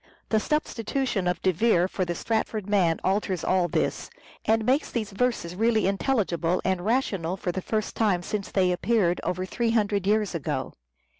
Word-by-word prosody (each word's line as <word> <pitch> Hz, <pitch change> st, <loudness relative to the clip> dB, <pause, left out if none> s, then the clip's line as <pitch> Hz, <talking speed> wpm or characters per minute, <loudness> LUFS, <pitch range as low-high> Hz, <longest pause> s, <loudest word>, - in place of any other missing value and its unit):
The 220 Hz, -, +3 dB
substitution 245 Hz, -, -1 dB
of 180 Hz, -1 st, -1 dB
De 185 Hz, -, +4 dB
Vere 180 Hz, -1 st, +3 dB
for 190 Hz, -1 st, -2 dB
the 175 Hz, 0 st, -3 dB
Stratford 220 Hz, 0 st, -2 dB
man 185 Hz, -5 st, +2 dB
alters 190 Hz, -2 st, 0 dB
all 185 Hz, -2 st, +2 dB
this, -, -, -1 dB, 0.4 s
and 220 Hz, 0 st, +2 dB
makes 265 Hz, +5 st, +2 dB
these 220 Hz, -4 st, -3 dB
verses 195 Hz, -5 st, -1 dB
really 220 Hz, +2 st, +2 dB
intelligible 190 Hz, -5 st, +1 dB
and 185 Hz, -2 st, 0 dB
rational 195 Hz, -6 st, 0 dB
for 180 Hz, -, -2 dB
the 190 Hz, -, -4 dB
first 215 Hz, +2 st, -2 dB
time 200 Hz, -6 st, +1 dB
since 200 Hz, +2 st, -3 dB
they 185 Hz, -2 st, +2 dB
appeared 180 Hz, -1 st, +1 dB
— -, -, -29 dB
over 185 Hz, +1 st, -2 dB
three 235 Hz, +5 st, -1 dB
hundred 205 Hz, -4 st, +1 dB
years 210 Hz, -1 st, +2 dB
ago. 165 Hz, -5 st, -3 dB
200 Hz, 175 wpm, -26 LUFS, 180-225 Hz, 0.4 s, De